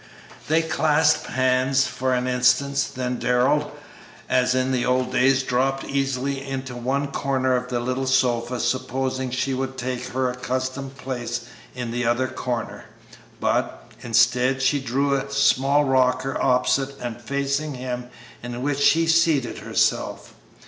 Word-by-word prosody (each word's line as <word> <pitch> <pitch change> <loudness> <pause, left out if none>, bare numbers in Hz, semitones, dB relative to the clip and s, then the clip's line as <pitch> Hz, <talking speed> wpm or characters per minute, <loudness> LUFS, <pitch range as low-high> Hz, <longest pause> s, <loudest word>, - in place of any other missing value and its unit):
They 160 +2 +3
clasped 155 -1 +2
hands 130 +1 +2
for 130 0 -1
an 125 0 -1
instant, 125 +3 +2
then 125 -1 -2
Darrell, 135 +4 +2 0.6
as 125 0 +2
in 130 0 +1
the 125 -2 +1
old 125 0 +1
days, 135 +1 +3
dropped 135 +2 0
easily 135 0 -2
into 135 -2 -5
one 135 +4 -1
corner 130 -2 0
of 125 0 -2
the 120 -1 -1
little 130 +2 -2
sofa, 125 -2 +1
supposing 130 +1 -1
she 130 +2 -1
would 130 0 -3
take 125 -1 -4
her 130 0 -1
accustomed 130 +2 -4
place 125 -4 -4 0.3
in 125 -2 -4
the 120 +1 -2
other 120 +2 +1
corner, 125 -2 -4 0.5
but, - - -1
instead, 125 +3 +2
she 140 +2 +3
drew 135 +2 0
a 140 0 -2
small 140 +1 +3
rocker 130 0 +1
opposite 135 +2 +1
and 120 -1 -6
facing 140 +3 -2
him, 125 -1 -5 0.3
in 120 +1 -6
which 145 0 -1
she 165 +3 +4
seated 160 -6 +2
herself. - - -1
130 Hz, 140 wpm, -23 LUFS, 125-135 Hz, 0.6 s, she